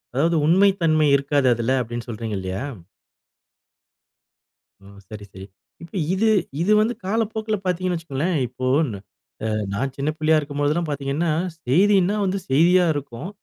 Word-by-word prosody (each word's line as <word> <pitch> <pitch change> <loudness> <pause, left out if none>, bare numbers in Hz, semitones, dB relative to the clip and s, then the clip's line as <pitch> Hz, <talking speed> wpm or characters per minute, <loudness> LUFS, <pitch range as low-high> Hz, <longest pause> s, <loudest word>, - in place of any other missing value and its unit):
அதாவது 165 +4 +2
உண்மை 190 +5 +5
தன்மை 155 -2 +3
இருக்காது 140 -1 +1
அதுல, 120 +2 -2
அப்படின்னு 120 +1 -6
சொல்றீங்க 110 -2 -4
இல்லயா? 95 +5 -4 2.2
ஓ. - - -18 0.2
சரி, 105 -2 -9
சரி. 95 +1 -9 0.4
இப்ப 170 - -13 0.2
இது 220 +4 +1 0.3
இது 200 +5 +1
வந்து 230 +3 +1
காலப்போக்குல 220 +1 -1
பார்த்தீங்கன்னு 180 0 -1
வச்சுக்கோங்களேன். 165 +2 -2
இப்போ 130 +1 -6 0.3
ந - - -5 0.5
அ - - 0 0.3
நான் 135 +5 -2
சின்ன 140 +2 -2
பிள்ளையா 155 0 +3
இருக்கும்போதெல்லாம் 145 +3 -1
பார்த்தீங்கன்னா, 145 +4 -2 0.4
செய்தினா 195 +6 +3
வந்து 190 +1 -1
செய்தியா 175 +6 +4
இருக்கும். 145 +3 -6
155 Hz, 135 wpm, -22 LUFS, 130-185 Hz, 2.2 s, உண்மை